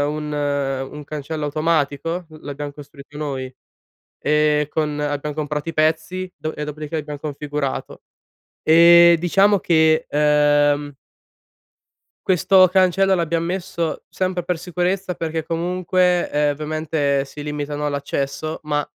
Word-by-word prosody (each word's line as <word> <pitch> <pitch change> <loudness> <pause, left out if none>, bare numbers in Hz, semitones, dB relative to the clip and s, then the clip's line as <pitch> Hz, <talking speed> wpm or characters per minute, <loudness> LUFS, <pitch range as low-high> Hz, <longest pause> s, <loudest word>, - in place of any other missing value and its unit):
un 150 -1 -4 0.6
un 150 0 -8
cancello 150 +1 -5
automatico, 155 +2 -1
uhm 155 -1 -14
l'abbiam 145 0 -6
costruito 145 0 -14
noi, 135 -3 -4 0.7
e 150 -1 +2
con 150 -2 -1
abbiam 145 0 -3
comprato 150 0 -3
i 165 - -4
pezzi, 160 +4 0
do 155 - -5
e 150 - -4
dopodiché 150 +1 -5
l'abbiam 150 -1 -5
configurato. 145 -1 -4 0.6
E 170 +1 +7
diciamo 195 +4 +3
che, 160 -3 +3
ehm 145 -1 +2 1.3
questo 185 +1 +5
cancello 190 +1 +3
l'abbiam 170 -1 0
messo 170 -2 -3
sempre 185 -1 -2
per 175 0 -2
sicurezza 180 +2 -2
perché 160 -1 -3
comunque, 180 +1 0
ehm, 150 0 +1
ovviamente 150 -2 -1
si 145 +2 -11
limitano 150 0 -3
all'accesso 140 +2 -3
ma, 150 -1 -1
155 Hz, 120 wpm, -21 LUFS, 145-170 Hz, 1.3 s, E